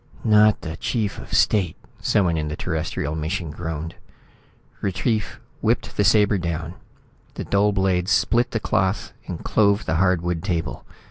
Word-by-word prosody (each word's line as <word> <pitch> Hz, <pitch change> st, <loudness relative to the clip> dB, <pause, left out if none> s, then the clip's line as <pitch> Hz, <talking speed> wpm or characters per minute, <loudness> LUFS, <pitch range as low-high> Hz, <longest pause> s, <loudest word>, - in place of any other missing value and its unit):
"Not 105 Hz, -1 st, +5 dB
the 80 Hz, -2 st, -6 dB
chief 110 Hz, -5 st, -2 dB
of -, -, -11 dB
state," 95 Hz, -7 st, +2 dB, 0.2 s
someone 90 Hz, -5 st, +2 dB
in 75 Hz, -1 st, -1 dB
the 75 Hz, -, -3 dB
Terrestrial 80 Hz, -3 st, -3 dB
mission 80 Hz, +1 st, -3 dB
groaned. 80 Hz, +1 st, -5 dB, 0.9 s
Retief 100 Hz, +3 st, -1 dB, 0.2 s
whipped -, -, 0 dB
the 105 Hz, -, +2 dB
sabre 105 Hz, 0 st, +4 dB
down. 85 Hz, -1 st, -3 dB, 0.6 s
The -, -, -4 dB
dull 100 Hz, +1 st, +2 dB
blade 95 Hz, -2 st, +1 dB
split 120 Hz, +6 st, +2 dB
the 115 Hz, -, -2 dB
cloth 95 Hz, 0 st, 0 dB
and -, -, -6 dB
clove 100 Hz, 0 st, +3 dB
the 80 Hz, -, 0 dB
hardwood 90 Hz, -2 st, +1 dB
table. 85 Hz, -4 st, -3 dB
90 Hz, 145 wpm, -23 LUFS, 80-105 Hz, 0.9 s, Not